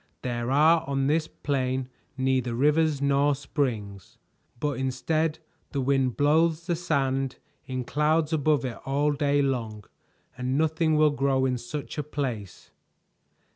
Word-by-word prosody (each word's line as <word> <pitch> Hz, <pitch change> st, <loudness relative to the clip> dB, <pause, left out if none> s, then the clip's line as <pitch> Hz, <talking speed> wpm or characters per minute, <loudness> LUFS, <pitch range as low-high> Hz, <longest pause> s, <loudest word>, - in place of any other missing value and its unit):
There 120 Hz, -1 st, -2 dB
are 155 Hz, +4 st, +4 dB
on 135 Hz, -1 st, 0 dB
this 155 Hz, +2 st, +1 dB
plain 130 Hz, -4 st, -2 dB, 0.3 s
neither 130 Hz, -2 st, 0 dB
rivers 150 Hz, +2 st, +2 dB
nor 140 Hz, +1 st, +3 dB
springs, 115 Hz, -, -3 dB, 0.4 s
but 145 Hz, -1 st, -1 dB
instead 155 Hz, +5 st, 0 dB, 0.4 s
the 140 Hz, -, -1 dB
wind 135 Hz, -2 st, +1 dB
blows 160 Hz, +3 st, +2 dB
the 175 Hz, -2 st, 0 dB
sand 135 Hz, -6 st, -1 dB, 0.3 s
in 130 Hz, -1 st, -3 dB
clouds 150 Hz, +4 st, +1 dB
above 150 Hz, -2 st, +2 dB
it 120 Hz, -3 st, -5 dB
all 145 Hz, +2 st, +1 dB
day 145 Hz, 0 st, +1 dB
long, 115 Hz, -6 st, -2 dB, 0.5 s
and 125 Hz, +2 st, -1 dB
nothing 160 Hz, 0 st, +2 dB
will 155 Hz, -1 st, +5 dB
grow 135 Hz, -2 st, +1 dB
in 125 Hz, -2 st, 0 dB
such 145 Hz, +5 st, -6 dB
a -, -, -1 dB
place. 125 Hz, -10 st, -5 dB
140 Hz, 135 wpm, -26 LUFS, 130-150 Hz, 0.5 s, will